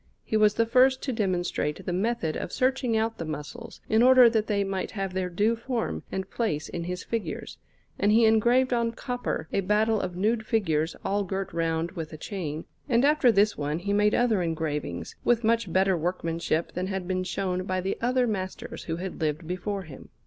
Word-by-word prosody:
He - - -3
was 210 -1 +4
the 230 - +3
first 260 +3 +4
to 265 - -1
demonstrate 180 -8 -1
the 180 - -2
method 190 -4 -1
of - - -4
searching 255 -3 +1
out 225 +1 -1
the - - -2
muscles, 155 +10 -7
in 220 +1 +3
order 250 -1 +7
that 220 -2 +1
they 200 -2 +1
might 195 -1 -3
have 195 -3 -3
their 185 -1 -1
due 210 +6 +1
form 235 0 -3
and 190 0 -3
place 155 -12 -2
in 170 -1 -5
his 180 +1 -4
figures, 230 -2 -4 0.4
and 205 - +3
he 225 +1 +5
engraved 240 +4 +4
on 235 -1 +1
copper 245 -9 -3
a - - +2
battle 210 +3 +2
of 180 -1 -4
nude 220 +4 +1
figures 165 -8 0
all 200 +1 +1
girt 190 0 -4
round 165 0 -1
with 165 -4 -6
a - - -7
chain; 160 -4 -5 0.2
and 240 +1 +4
after 295 -4 +5
this 205 0 +3
one 145 +1 -1
he 200 +4 -2
made 210 +1 +3
other 230 -5 +2
engravings, 155 - -3
with 240 -1 +2
much 225 -4 +1
better 190 +1 +3
workmanship 170 -1 -1
than 185 +1 -3
had 190 -2 -3
been 185 0 -1
shown 185 0 -2
by 185 -1 -1
the 190 +2 -2
other 250 +1 +2
masters 190 -5 -4
who 165 - -2
had 180 0 -6
lived 155 +1 -1
before 190 +3 -3
him. 155 -6 -12
195 Hz, 200 wpm, -27 LUFS, 175-230 Hz, 0.4 s, order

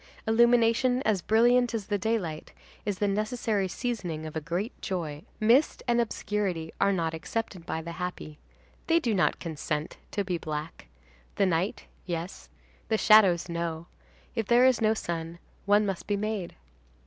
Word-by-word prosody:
Illumination 235 +2 +4
as 210 -4 +1
brilliant 240 +4 +3
as 215 -3 -3
the 205 +1 0
daylight 190 -7 -2 0.3
is 205 -2 -1
the 205 - +1
necessary 215 0 0
seasoning 180 -8 -3
of 155 - -7
a 160 - -2
great 175 +9 -3
joy. 165 -7 -3 0.2
Mist 235 +8 +3
and 240 0 +3
obscurity 200 -7 -2
are 200 - +4
not 165 -4 -1
accepted 185 +1 -4
by 160 - -3
the 170 - -6
happy. 175 -4 -6 0.5
They 335 0 +4
do 235 -9 0
not 185 - +2
consent 155 -2 -4
to 200 - -1
be 180 -3 -2
black. 155 - -6 0.5
The 200 - +3
night, 185 +2 -1 0.2
yes; 175 +1 -5 0.4
the 220 - +1
shadows, 195 -7 +5
no. 170 -1 -3 0.5
If 225 -4 -2
there 240 +1 +5
is 260 -3 +4
no 220 0 +3
sun, 165 -4 -4 0.3
one 205 +1 +5
must 195 -3 -3
be 205 - +1
made. 210 -3 -3
200 Hz, 160 wpm, -28 LUFS, 170-225 Hz, 0.5 s, shadows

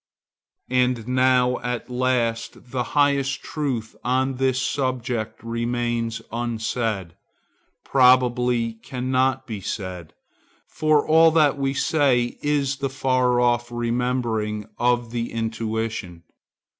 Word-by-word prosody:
And 125 -2 +1
now 125 0 +3
at 125 0 -4
last 120 -2 -1
the 130 - -1 0.2
highest 140 -1 +2
truth 130 -7 -3
on 130 +1 0
this 130 -1 +1
subject 130 -5 -2
remains 115 0 -2
unsaid; 115 -5 -2 0.7
probably 125 -2 +3
cannot 130 +1 0
be 110 -5 -6
said; 90 -4 -6 0.5
for 155 -1 +1
all 160 +1 +6
that 155 -3 +3
we 135 -1 -1
say 130 -6 +1
is 140 -2 0
the 135 0 -2
far 130 -2 +1
off 120 0 +1
remembering 120 -3 -1
of 120 -1 +1
the 120 -1 -3
intuition. 110 -5 -3
125 Hz, 105 wpm, -23 LUFS, 115-130 Hz, 0.7 s, all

